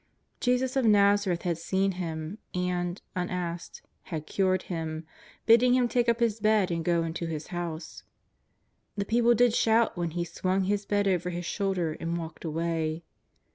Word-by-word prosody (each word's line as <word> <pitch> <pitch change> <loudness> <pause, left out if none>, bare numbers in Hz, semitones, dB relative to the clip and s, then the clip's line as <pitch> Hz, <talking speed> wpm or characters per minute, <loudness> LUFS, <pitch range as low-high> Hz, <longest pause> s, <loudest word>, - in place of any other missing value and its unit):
Jesus 250 +1 +1
of 265 - +2
Nazareth 200 -4 +4
had 170 -2 -1
seen 190 +3 +1
him, 170 +1 -5 0.2
and, 180 0 -1 0.2
unasked, 175 -1 -4 0.2
had 155 -4 -5
cured 185 +1 +1
him, 160 -2 -4 0.4
bidding 240 +2 +6
him 250 -1 +3
take 240 0 +1
up 235 0 +2
his 230 -2 +1
bed 215 -3 +3
and 165 -1 -1
go 170 0 +2
into 165 +1 -3
his 155 -2 -5
house. 170 -2 -5 1.0
The 200 - -1
people 235 +2 +3
did 245 0 +4
shout 225 0 +3
when 175 -2 -1
he 175 - +1
swung 185 +2 -1
his 200 +1 -1
bed 205 -1 +1
over 180 -2 +1
his 175 0 -4
shoulder 180 -5 -1
and 165 +1 -2
walked 165 -1 -7
away. 165 0 -2
180 Hz, 165 wpm, -28 LUFS, 170-210 Hz, 1.0 s, bidding